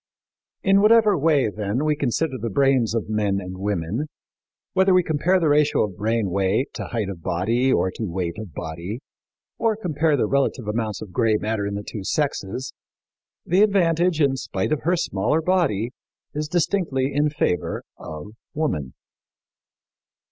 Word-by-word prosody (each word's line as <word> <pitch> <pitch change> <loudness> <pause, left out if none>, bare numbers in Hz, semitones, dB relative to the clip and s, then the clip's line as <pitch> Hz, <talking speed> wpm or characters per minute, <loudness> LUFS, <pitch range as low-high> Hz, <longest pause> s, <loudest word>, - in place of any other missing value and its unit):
In 195 +1 +4
whatever 215 -1 +5
way, 145 -4 +3
then, 105 +6 -2
we 155 -1 +2
consider 140 0 -1
the 115 - -2
brains 130 -1 +2
of 115 - -1
men 105 -2 0
and 90 -1 -7
women, 100 - -2 0.7
whether 190 0 +4
we 180 - +5
compare 170 +4 +2
the 165 - +1
ratio 150 0 +3
of 105 -4 -4
brain 110 -1 0
weight 100 +7 +1
to - - -5
height 115 -5 -2
of 95 -4 -7
body 115 +11 +1
or 95 -7 +2
to 110 -1 -4
weight 85 0 -3
of 110 -5 -7
body, 85 - -6 0.6
or 225 -2 +2
compare 160 -6 +1
the 120 - +2
relative 135 -2 0
amounts 105 -2 -2
of 100 - -11
gray 115 0 +2
matter 105 -1 -2
in 100 - -3
the 100 - -4
two 105 - -5
sexes, 130 -1 -2 0.7
the 180 +4 +3
advantage, 175 -5 +3
in 140 -3 +3
spite - - -3
of 155 - 0
her 175 +2 +3
smaller 150 - 0
body, 160 - +1 0.4
is 150 +1 -2
distinctly 155 -5 0
in 145 +2 +2
favor 145 - -1
of 75 +5 -8 0.3
woman. 75 - -2
130 Hz, 160 wpm, -23 LUFS, 100-155 Hz, 0.7 s, whatever